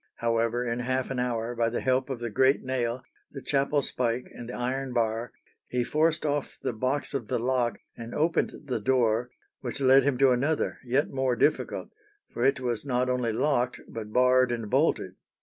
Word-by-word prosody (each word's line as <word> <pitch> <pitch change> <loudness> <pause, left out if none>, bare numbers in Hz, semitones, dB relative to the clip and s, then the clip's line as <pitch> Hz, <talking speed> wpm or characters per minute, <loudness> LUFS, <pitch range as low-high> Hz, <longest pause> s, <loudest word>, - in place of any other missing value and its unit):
However, 115 +1 0
in 120 0 -2
half 130 +1 -1
an 130 - -2
hour, 120 -1 -1
by 115 -1 +1
the 120 - -2
help 130 +1 +1
of 130 -3 -3
the 120 -2 -3
great 130 +5 +3
nail, 130 -1 -2 0.3
the 140 - -5
chapel 140 0 +1
spike, 125 -1 -1
and 120 - -8
the - - -5
iron 130 +1 -2
bar, 115 0 0 0.4
he 125 -1 0
forced 155 +4 +1
off 145 -1 -2
the - - -2
box 130 +6 -1
of 130 -6 -3
the - - 0
lock 120 -2 0 0.2
and 115 0 -8
opened 165 +2 +1
the 125 -5 -2
door 120 0 +2 0.3
which 125 +1 -5
led 135 0 +6
him 140 -2 +1
to 135 0 +5
another 145 +5 0
yet 130 +4 +1
more 130 -2 +1
difficult, 145 +6 0 0.4
for 120 - -2
it 135 +1 +3
was 120 -4 -2
not 125 -2 0
only 125 -2 0
locked, 125 +1 0
but 110 -2 -7
barred 125 +1 +4
and 115 -3 -4
bolted. - - +1
125 Hz, 190 wpm, -27 LUFS, 120-135 Hz, 0.4 s, led